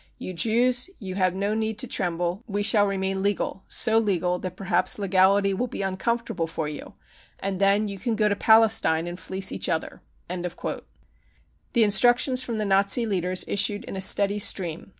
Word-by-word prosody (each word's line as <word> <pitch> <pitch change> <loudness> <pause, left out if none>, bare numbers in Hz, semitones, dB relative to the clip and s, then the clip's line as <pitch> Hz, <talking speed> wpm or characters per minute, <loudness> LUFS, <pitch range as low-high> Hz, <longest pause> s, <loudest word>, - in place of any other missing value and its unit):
You 185 - -7
Jews, 245 - +2
you 190 -5 -7
have 185 -1 0
no 200 +2 -1
need 220 0 -2
to 255 - 0
tremble, 175 -1 -2
we 205 -1 -2
shall 205 -1 +3
remain 190 -1 -2
legal, 200 -1 -2
so 225 -1 +3
legal 180 -4 -1
that 185 -1 -6
perhaps 185 -1 0
legality 195 0 +2
will 245 +6 -2
be 200 - -5
uncomfortable 195 -2 -2
for 160 -1 -4
you, 150 -1 -9 0.4
and 195 0 -4
then 200 +2 +3
you 200 -1 -7
can 235 0 -2
go 215 -1 +1
to 205 - 0
Palestine 220 -7 +3
and 175 +1 -7
fleece 190 0 0
each - - -3
other." 165 -2 -3 0.3
The 180 0 -5 1.0
instructions 245 +4 +3
from 235 -3 -4
the 215 - -2
Nazi 200 +4 +2
leaders 185 -3 -1
issued 205 +1 +1
in - - -8
a 190 - -4
steady 200 +2 +3
stream. 175 -4 -1
195 Hz, 175 wpm, -24 LUFS, 185-215 Hz, 1.0 s, shall